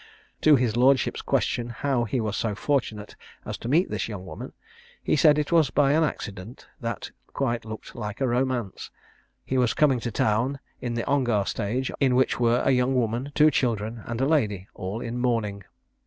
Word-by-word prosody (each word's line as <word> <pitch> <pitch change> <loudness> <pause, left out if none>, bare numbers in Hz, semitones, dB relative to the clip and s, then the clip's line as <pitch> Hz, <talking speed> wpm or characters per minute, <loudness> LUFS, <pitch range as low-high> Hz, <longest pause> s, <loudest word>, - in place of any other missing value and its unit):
To 155 -1 +7
his 120 -4 +1
lordship's 130 +2 +3
question 120 0 0
how 120 0 -1
he 125 +4 -1
was 110 -2 -2
so 105 -1 -1
fortunate 110 -3 -2 0.3
as - - -4
to - - -6
meet 165 +7 +2
this - - -2
young 100 -4 -7
woman, 80 -4 -8 0.5
he - - +2
said 150 0 +5
it 150 +1 -1
was 160 -5 +4
by 140 +1 +3
an 160 +2 +3
accident, 105 -6 -5
that 115 -3 -4 0.2
quite 120 -5 -1
looked 110 0 -8
like 105 -2 -5
a 135 - +1
romance. 125 -4 -1 0.6
He 130 - 0
was 125 -2 +2
coming 135 -5 +3
to 120 - -3
town 115 +5 0 0.2
in 120 -1 -3
the 115 - -2
Ongar 120 -8 +1
stage, 110 +6 -2
in 130 -3 +3
which 130 -1 +2
were 120 0 +3
a - - +4
young 125 +1 +2
woman, 120 +3 -1
two 155 0 +6
children, 115 -4 -1
and 115 0 -3
a 135 - +2
lady, 105 - +1
all 100 +5 -5
in 120 +1 -4
mourning. 110 -6 -1
120 Hz, 190 wpm, -25 LUFS, 110-135 Hz, 0.6 s, To